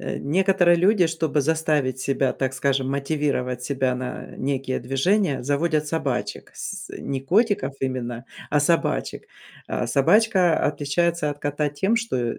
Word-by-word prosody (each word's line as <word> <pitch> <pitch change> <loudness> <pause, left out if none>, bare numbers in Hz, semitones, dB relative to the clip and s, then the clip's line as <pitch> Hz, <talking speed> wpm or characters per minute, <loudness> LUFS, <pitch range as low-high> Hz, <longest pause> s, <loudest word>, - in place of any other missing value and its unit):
Э, - - -4
некоторые 175 +2 +3
люди, 185 +1 +4
чтобы 160 -2 0
заставить 150 -3 0
себя, 135 -1 0
так 130 -1 -2
скажем, 135 0 0
мотивировать 140 -3 -1
себя 130 -1 0
на 125 0 -5
некие 135 -1 -2
движения, 135 - +1
заводят 150 +3 0
собачек, 135 -10 -3
с - - -6
с - - -18
не 135 -1 -3
котиков 180 - +1
именно, 125 -2 -3 0.3
а 150 - +3
собачек. 165 +3 0 0.4
А - - -2
собачка 180 - +3
отличается 150 +2 0
от 145 - -7
кота 145 +1 -1
тем, 190 +10 0
что, 230 - -1
э, 120 -2 -2
145 Hz, 145 wpm, -23 LUFS, 130-170 Hz, 0.4 s, люди